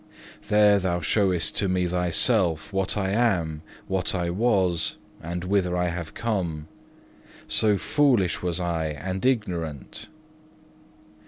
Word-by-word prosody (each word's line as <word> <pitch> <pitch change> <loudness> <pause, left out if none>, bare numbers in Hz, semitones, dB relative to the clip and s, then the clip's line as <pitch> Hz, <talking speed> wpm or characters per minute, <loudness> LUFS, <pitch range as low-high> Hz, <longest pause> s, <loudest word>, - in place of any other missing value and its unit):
There 105 -1 +5
Thou 90 -2 -1
showest 90 -1 +1
to 100 - +1
me 90 -1 +1
myself, 90 +1 +1
what 95 +1 -1
I 95 -2 0
am, 90 -9 0 0.3
what 95 -1 -1
I 85 -2 -1
was, 95 -5 +1 0.3
and 85 +2 -5
whither 90 -2 0
I 90 0 +1
have 85 -2 -6
come: 85 -9 -2 0.8
so 105 -2 +3
foolish 125 - +2
was 90 -1 -1
I 85 -3 -1
and 90 +6 -5
ignorant. 90 - -2
90 Hz, 120 wpm, -25 LUFS, 85-100 Hz, 0.8 s, There